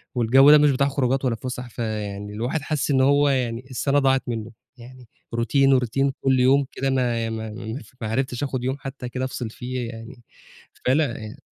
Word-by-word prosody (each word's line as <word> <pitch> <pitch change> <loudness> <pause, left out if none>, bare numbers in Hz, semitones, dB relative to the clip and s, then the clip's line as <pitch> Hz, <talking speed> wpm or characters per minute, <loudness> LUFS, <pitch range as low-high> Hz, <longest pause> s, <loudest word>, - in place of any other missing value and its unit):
والجو 130 +4 +6
ده 150 - +9
مش 145 -1 +4
بتاع 140 +1 +2
خروجات 135 -1 0
ولا 120 -3 +1
فُسح، 125 +1 -6
فيعني 105 -3 -4
الواحد 120 +8 -2
حَاسس 150 0 -1
إن 130 -1 +3
هو 145 +2 +4
يعني 125 -2 -1
السَنة 140 +3 +1
ضاعت 135 -1 +2
مِنّه، 115 -1 -4 0.3
يعني 125 0 -13 0.3
routine 135 +4 +2
وroutine 135 +3 0
كُلّ 130 -1 +2
يوم 135 +2 +4
كده 135 - -2
ما 120 -3 0
ما 110 0 -5
ما 110 +4 -6
ف 110 - -20
ما 110 - -2
عرفتش 130 +3 -2
آخد 130 -3 -3
يوم 130 +2 -1
حتى 135 -3 -7
كده 130 +1 -3
أفصِل 125 -3 -5
فيه 125 +1 -5
يعني، 120 +2 -10 0.6
فأنا 130 -4 +1
ي 105 - -10
130 Hz, 195 wpm, -23 LUFS, 115-135 Hz, 0.6 s, ده